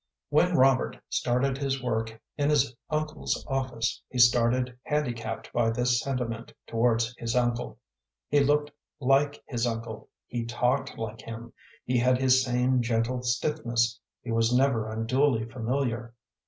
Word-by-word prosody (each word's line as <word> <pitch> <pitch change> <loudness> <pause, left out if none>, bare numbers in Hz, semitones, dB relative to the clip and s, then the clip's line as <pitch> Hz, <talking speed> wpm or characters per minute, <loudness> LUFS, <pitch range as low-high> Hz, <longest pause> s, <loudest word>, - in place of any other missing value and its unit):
When 175 +4 +3
Robert 130 0 +3
started 130 +2 0
his 135 -2 -2
work 110 -2 -2 0.2
in 145 0 +1
his 140 -5 +2
uncle's 155 0 -2
office 130 -4 -2
he 125 - -6
started 120 +1 +4
handicapped 120 -7 -3
by 120 -1 +2
this 125 +1 +1
sentiment 120 -4 -3
towards 115 0 +1
his 115 0 -2
uncle. 120 -1 0 0.5
He 145 - +3
looked 145 +1 +2 0.3
like 140 +2 +2
his 120 -2 -1
uncle, 115 -1 -5 0.2
he 120 -1 -3
talked 125 +3 -1
like 110 0 -5
him, 115 0 -8 0.3
he 125 0 +1
had 125 +1 +3
his 130 0 +4
same 125 0 +2
gentle 115 +1 0
stiffness, 120 -2 0 0.2
he 115 - -4
was 115 +1 +2
never 125 -4 +2
unduly 115 +2 +1
familiar. 120 0 -2
125 Hz, 140 wpm, -27 LUFS, 115-135 Hz, 0.5 s, started